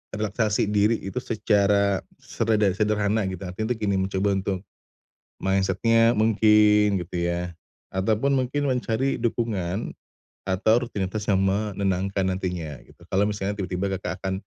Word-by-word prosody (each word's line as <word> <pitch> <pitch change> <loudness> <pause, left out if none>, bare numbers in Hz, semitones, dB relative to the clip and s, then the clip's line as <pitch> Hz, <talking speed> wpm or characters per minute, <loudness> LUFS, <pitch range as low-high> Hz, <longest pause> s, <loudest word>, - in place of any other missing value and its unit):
relaksasi 105 0 0
diri 105 +2 +3
itu 95 +5 -3
secara 100 -3 +2 0.2
sereda 110 -2 0
sederhana 105 +1 +1
gitu, 95 0 -6
artinya 110 +6 -2
itu - - -9
gini 100 -1 +1
mencoba 95 +1 0
untuk 95 0 -2 0.8
mindset-nya 115 +4 +3
mungkin 105 -2 +4
gitu 90 +1 -7
ya, 85 0 -2 0.4
ataupun 110 +8 +1
mungkin 130 +3 -1
mencari 130 +1 0
dukungan 110 -4 -2 0.6
atau 95 +4 +3
rutinitas 105 -1 -4
yang 100 -2 +3
menenangkan 95 -1 0
nantinya, 90 -6 -3
gitu. - - -22
Kalau 95 - +1
misalnya 100 -1 -2
tiba-tiba 95 -1 -2
Kakak - - -4
akan 95 0 -1
100 Hz, 130 wpm, -25 LUFS, 95-110 Hz, 0.8 s, mungkin